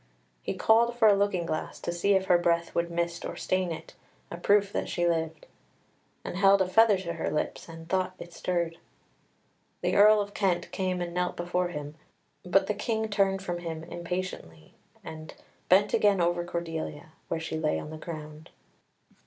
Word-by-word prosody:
He - - -3
called 235 +2 +3
for 225 -2 +6
a 210 - +7
looking 195 -3 +1
glass, 155 -2 -4
to - - -2
see 185 +4 +2
if 190 0 +2
her 175 -2 +4
breath 170 -1 +1
would 170 0 0
mist 170 0 -2
or - - -5
stain 185 -2 -1
it, 160 - -7 0.4
a 170 - -5
proof 200 +2 +3
that - - -2
she 175 0 0
lived; 160 -2 -1 0.8
and - - -4
held 195 0 +6
a 190 - +2
feather 215 +2 +5
to 175 -2 -4
her 165 - -2
lips, 150 - -3
and 165 0 -10
thought 185 +1 0
it 170 - -10
stirred. 170 -2 -2 1.0
The - - 0
Earl 210 +1 +7
of 205 0 -3
Kent 190 -4 0
came 185 -1 -1
and 170 0 -6
knelt 180 0 -1
before 175 +1 0
him, 150 -3 -6 0.5
but - - +3
the - - -1
King 220 -2 -2
turned 195 -2 +1
from 175 -2 -3
him 165 -2 -5
impatiently, 170 - -6 0.3
and 155 0 -9 0.3
bent 195 +3 +5
again 205 -2 +4
over 175 0 +1
Cordelia, 165 -2 -5 0.2
where 165 - -2
she 160 -1 -4
lay 155 -1 +1
on 150 - -6
the 155 - -7
ground. 155 -2 -8
175 Hz, 185 wpm, -28 LUFS, 165-195 Hz, 1.0 s, a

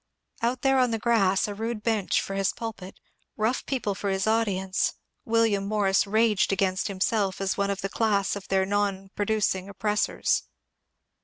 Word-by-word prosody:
Out 240 +2 -1
there 270 -1 +4
on 250 -1 +3
the 225 - -1
grass, 215 -5 +2
a 205 - -4
rude 225 +1 -4
bench 220 -4 +1
for 195 - -5
his 195 -1 0
pulpit, 205 -5 -7 0.4
rough 220 +4 0
people 245 -7 -1
for 200 +1 -3
his 195 0 0
audience, 195 -4 0 0.3
William 225 -3 +2
Morris 200 -1 +2
raged 215 -1 +2
against 190 -1 0
himself 195 0 0
as 195 -1 -1
one 200 0 0
of 200 -1 -2
the 195 - -1
class 200 -2 +1
of 200 -1 -8
their 190 0 +2
non 195 -1 -1
produ 215 +1 0
cing 190 +1 0
oppressors. 210 +1 0
205 Hz, 170 wpm, -26 LUFS, 195-225 Hz, 0.4 s, there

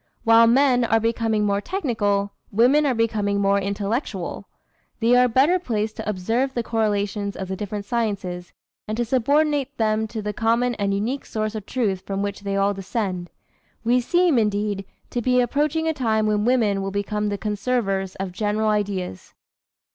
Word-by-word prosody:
While 230 0 +6
men 250 0 +4
are 225 -1 +3
becoming 225 -1 0
more 200 0 +1
technical, 205 - -1 0.2
women 260 +8 +4
are 260 - +1
becoming 210 -3 0
more 200 0 +3
intellectual. 200 +6 -3 0.5
They 240 +1 +4
are 250 0 +5
better 275 +10 +3
placed 215 -8 -2
to - - -4
observe 225 +8 -1
the 240 - 0
correlations 205 -3 -1
of 190 - -5
the 190 - -2
different 205 0 -5
sciences, 200 -6 -3 0.4
and 215 +1 -3
to 240 - 0
subordinate 285 +3 +1
them 220 0 +1
to 220 -1 -6
the 210 0 -3
common 235 +3 +1
and 200 -1 0
unique 225 +8 -2
source 215 -1 -2
of 215 -2 -6
truth 205 -7 -1
from 195 +1 -3
which 200 -1 -3
they 200 -1 -3
all 200 +1 +2
descend. 190 -2 -3 0.5
We 245 +2 +3
seem, 345 +1 +3
indeed, 205 -2 -1 0.3
to 240 - -1
be 250 +1 +2
approaching 300 +5 +1
a 320 - +1
time 220 -6 +1
when 210 0 +1
women 220 -6 +2
will 195 - -2
become 205 +1 -2
the 205 - -2
conservers 200 -3 -1
of 190 -1 -4
general 215 +3 0
ideas." 200 - -3
215 Hz, 170 wpm, -23 LUFS, 200-245 Hz, 0.5 s, While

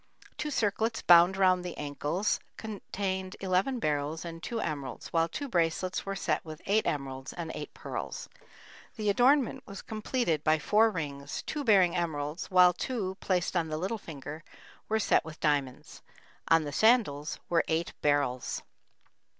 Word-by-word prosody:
Two 300 - -3
circlets 225 -3 0
bound 175 +2 +7
around 185 -2 +4
the 180 -1 -6
ankles 150 +7 -1 0.2
contained 190 -3 -4
eleven 190 +7 +1
beryls 150 -4 -1
and 165 -1 -7
two 235 +4 -3
emeralds, 145 -7 -5
while 165 0 +2
two 285 - -4
bracelets 180 -2 0
were 195 - -2
set - - -1
with 155 -1 -9
eight 215 +3 +2
emeralds 135 -2 -3
and 165 -2 -5
eight - - -6
pearls. - - -5 0.7
The 210 -2 +1
adornment 255 +4 +3
was 200 -2 -8
completed 215 - -1
by 155 0 +4
four 210 +9 +4
rings, 145 -7 -5
two 300 -2 -3
bearing 190 -7 +5
emeralds, 155 -2 -2
while 180 -1 +6
two, 190 -1 -3
placed 180 -1 0
on 170 -2 +1
the 155 -1 -3
little 195 +7 -2
finger, 155 -2 -8 0.5
were 220 - +2
set 220 - +3
with 160 -1 -10
diamonds. 145 -4 -1 0.5
On 165 -1 +5
the 145 - -4
sandals 200 - +3
were 170 -1 +2
eight 165 +1 -1
beryls. 140 -4 0
175 Hz, 155 wpm, -30 LUFS, 155-205 Hz, 0.7 s, bound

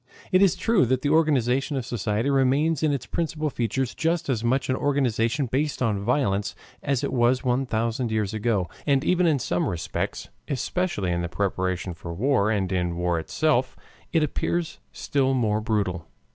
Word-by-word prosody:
It 185 - +5
is 195 -4 +5
true 225 - +2
that 130 +1 0
the 145 - +1
organization 135 -3 +2
of 130 - -3
society 115 +3 -1
remains 140 +3 +2
in 155 -2 +2
its 135 -4 -2
principal 155 -2 -2
features 125 +2 -1
just 165 -1 -1
as 120 -4 0
much 130 +3 +1
an 130 - +1
organization 135 -1 +1
based 140 +5 -1
on 105 -5 0
violence 105 -4 0 0.3
as 140 -3 -1
it - - -2
was 125 +1 +2
one 130 +1 +1
thousand 115 +1 -1
years 110 -2 -1
ago, 105 -4 0 0.2
and 140 -1 +3
even 180 +1 +3
in 155 -3 +3
some 90 -8 -1
respects, 85 -3 -4 0.2
especially 150 - -1
in 85 0 0
the 85 - -3
preparation 95 0 -2
for 85 0 -7
war 120 0 +2
and 100 -4 0
in 90 -2 -1
war 85 -1 0
itself, 130 - 0 0.3
it 165 -2 +3
appears 165 +3 -2
still 135 -2 0
more 110 -4 +1
brutal. 100 -6 -1
125 Hz, 175 wpm, -25 LUFS, 105-145 Hz, 0.3 s, It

